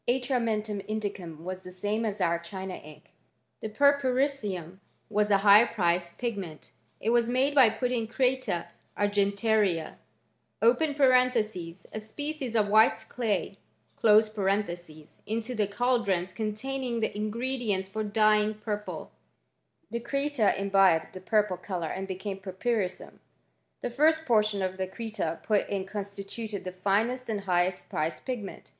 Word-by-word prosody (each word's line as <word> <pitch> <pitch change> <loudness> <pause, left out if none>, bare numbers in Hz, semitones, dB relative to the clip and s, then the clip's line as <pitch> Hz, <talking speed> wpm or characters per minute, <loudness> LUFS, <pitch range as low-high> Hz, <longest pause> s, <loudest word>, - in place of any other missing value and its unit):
Atrm^ 250 0 +1
mentum 215 -2 -1
indicum 195 -7 -4
was 185 +1 -5
the 185 - -9
same 205 +5 -2
as 210 -1 -2
our 170 -2 +1
China 190 +2 -6
ink. 155 -3 -12 0.5
The 220 - -4
purpurissum 255 - +1 0.3
was 210 0 +2
a 200 - +5
high 205 +2 +9
priced 175 -5 0
pigment, 200 -10 -5 0.3
h 225 - 0
was 235 0 +3
made 260 +3 +2
by 265 -5 +7
putting 245 0 -1
creta 250 -6 0 0.3
argentaria 205 -3 +1 0.6
(a 240 - +2
species 265 +3 -5
<rf 215 -2 +3
white 215 +2 +4
clay) 205 -4 -2 1.7
into 230 +3 -2
the 215 -4 +1
caldrons 200 -5 0
containing 235 +4 -3
the 220 - +1
ingfOM 235 +3 -3
dienU 190 -1 +1
for 215 +3 -4
dying 215 0 +3
purple. 210 0 -5 0.8
The 235 - -2
creta 275 -2 +1
imbibed 195 -4 +3
the 185 - -8
purpli 210 -2 +1
colour 175 -5 -3
and 195 0 -4
became 190 +1 -5
purpurissum. 190 0 -3 0.6
The 245 - -3
first 315 +5 +3
portion 215 -5 +2
cl 185 0 -2
creta 200 -6 -4
put 210 -2 +1
in 195 -2 -2
constituted 200 +1 -6
the 185 - -5
finest 215 +7 0
and 210 -2 -1
highest 180 -1 0
pricat 155 +2 -2
pigment. 240 -7 -5
210 Hz, 130 wpm, -28 LUFS, 190-240 Hz, 1.7 s, high